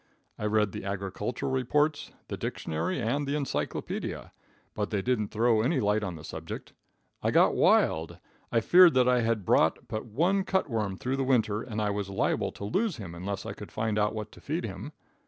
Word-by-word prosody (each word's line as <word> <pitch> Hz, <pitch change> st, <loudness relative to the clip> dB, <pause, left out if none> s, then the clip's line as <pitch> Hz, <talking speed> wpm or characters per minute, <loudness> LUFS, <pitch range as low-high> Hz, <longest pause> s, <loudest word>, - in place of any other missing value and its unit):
I -, -, -3 dB
read 105 Hz, -1 st, +2 dB
the -, -, -6 dB
agricultural 100 Hz, +5 st, -3 dB
reports, 145 Hz, +4 st, +1 dB, 0.2 s
the -, -, -4 dB
dictionary, 80 Hz, -, -3 dB
and 130 Hz, +5 st, -1 dB
the 140 Hz, -, 0 dB
encyclopedia, 130 Hz, -, -3 dB, 0.4 s
but 105 Hz, -1 st, -2 dB
they 100 Hz, -3 st, -1 dB
didn't 120 Hz, -5 st, +1 dB
throw 115 Hz, +1 st, +2 dB
any 130 Hz, +5 st, +1 dB
light 105 Hz, 0 st, +1 dB
on 95 Hz, -4 st, -3 dB
the 75 Hz, -, -10 dB
subject. -, -, -7 dB, 0.5 s
I -, -, +1 dB
got -, -, +5 dB
wild. 80 Hz, +1 st, +3 dB, 0.3 s
I 115 Hz, -, +3 dB
feared 175 Hz, +4 st, +7 dB
that 125 Hz, -1 st, +4 dB
I 125 Hz, -1 st, +4 dB
had 115 Hz, -4 st, 0 dB
brought -, -, +2 dB
but 110 Hz, +2 st, -4 dB
one 175 Hz, -, +1 dB
cut 190 Hz, -2 st, 0 dB
worm 105 Hz, -6 st, -2 dB
through 130 Hz, +6 st, -2 dB
the 135 Hz, -, 0 dB
winter, 115 Hz, -5 st, +2 dB
and 110 Hz, -3 st, -5 dB
I 105 Hz, -1 st, +1 dB
was 100 Hz, -1 st, -3 dB
liable 95 Hz, -, 0 dB
to 100 Hz, -, -7 dB
lose 195 Hz, -, 0 dB
him 95 Hz, -6 st, -7 dB
unless 95 Hz, +3 st, -5 dB
I -, -, -4 dB
could -, -, -10 dB
find 110 Hz, -1 st, -1 dB
out 105 Hz, +1 st, +1 dB
what 110 Hz, -1 st, -5 dB
to -, -, -15 dB
feed 160 Hz, +4 st, -2 dB
him. 105 Hz, +7 st, -6 dB
110 Hz, 200 wpm, -28 LUFS, 100-135 Hz, 0.5 s, feared